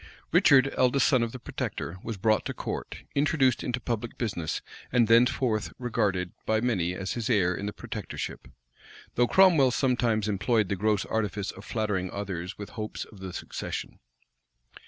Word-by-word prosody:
Richard, 135 0 +5
eldest 130 +2 +3
son 130 -3 +4
of 115 -1 -1
the 130 - -7
protector, 95 -6 -5
was 115 -3 -4
brought 110 +2 +2
to - - -4
court, - - -5
introduced 140 -3 +2
into 125 0 -1
public 120 -1 -3
business, 90 -9 -2 0.3
and 120 -2 +4
thenceforth 115 -1 +3
regarded 105 -8 0 0.2
by 110 0 +3
many 95 -7 0
as 95 +1 -4
his 120 -1 -3
heir 95 -6 +3
in 100 +3 -4
the - - -2
protectorship; - - -6 0.7
though 120 0 +3
Cromwell 160 - +6
sometimes 120 -4 +1
employed 105 +1 +1
the 100 - +1
gross 105 +1 +1
artifice 105 -2 -2
of 95 - -12
flattering 105 -4 -1
others 95 -2 -5
with 105 - -8
hopes 110 -1 -5
of 105 - -16
the 95 -1 -6
succession. - - -5
110 Hz, 160 wpm, -28 LUFS, 100-125 Hz, 0.7 s, Cromwell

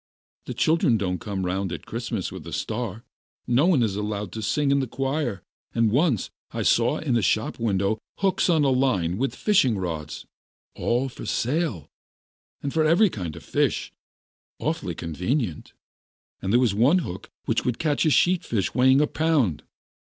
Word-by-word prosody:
The - - -5
children 155 -7 +3
don't 90 -3 -2
come 100 -5 -3
round 95 +1 -1
at - - -6
Christmas - - -4
with - - -9
a - - -7
star, 110 -1 -3 0.4
no 130 +7 +3
one 155 -10 +4
is 105 -4 0
allowed 105 -2 -3
to 110 - -5
sing 140 +7 +1
in 140 - +3
the 135 - -1
choir, 135 - -2 0.3
and 115 -2 +3
once 135 - +1 0.2
I - - -3
saw 120 +6 +3
in 140 -6 -1
a 115 - +3
shop 110 +6 0
window 105 -1 0 0.2
hooks 195 -1 +1
on 160 -3 +4
a 135 - +3
line 115 -8 +1
and 135 - +1
fishing 135 - +2
rods, 80 -5 -5 0.5
all 125 +3 0
for 120 - -9
sale, 120 - -1 0.7
and 140 - -3
for 160 - +2
every 175 +6 +4
kind 85 -7 -5
of - - -10
fish, - - 0 0.7
awfully - - -2
convenient. 90 - -3 0.7
And 95 - -2
there 120 - +5
was 120 -5 +2
one 125 - +4
hook 90 - -7 0.2
which - - 0
would 125 -2 -1
catch 150 -3 +1
a 160 - +3
sheat 175 +4 +3
fish 105 -5 -1
weighing 130 +3 +5
a - - +4
pound. 150 - +1
120 Hz, 175 wpm, -25 LUFS, 100-145 Hz, 0.7 s, there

